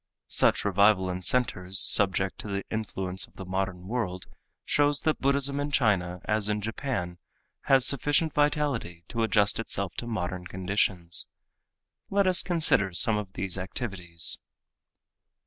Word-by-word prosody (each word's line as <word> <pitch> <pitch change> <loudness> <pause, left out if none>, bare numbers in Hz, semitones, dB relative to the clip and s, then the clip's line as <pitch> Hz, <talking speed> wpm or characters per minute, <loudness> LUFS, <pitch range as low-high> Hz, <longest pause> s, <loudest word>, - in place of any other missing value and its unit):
Such - - +2
revival 100 -1 +3
in 90 0 -5
centers 95 -5 +1
subject 95 -3 +5
to - - -6
the 100 -1 -3
influence 95 -5 -4
of - - -29
the 95 - -9
modern 95 -1 -4
world 95 -6 -4 0.4
shows 145 0 +1
that 155 -1 -1
Buddhism 140 +1 +1
in 145 +1 -2
China 95 -10 0
as 105 -1 +1
in 105 0 -1
Japan 105 -5 -4 0.5
has 135 -2 +4
sufficient 145 +3 +2
vitality 145 - -1
to 115 - -3
adjust 105 -2 +2
itself 100 -5 -3
to 120 - -4
modern 90 -5 -4
conditions. 90 -2 0 0.8
Let 200 0 +1
us 185 -1 +6
consider 160 - +1
some 110 +4 +2
of 100 -2 -8
these 95 +1 -2
activities. 90 -4 -4
100 Hz, 140 wpm, -27 LUFS, 90-125 Hz, 0.8 s, us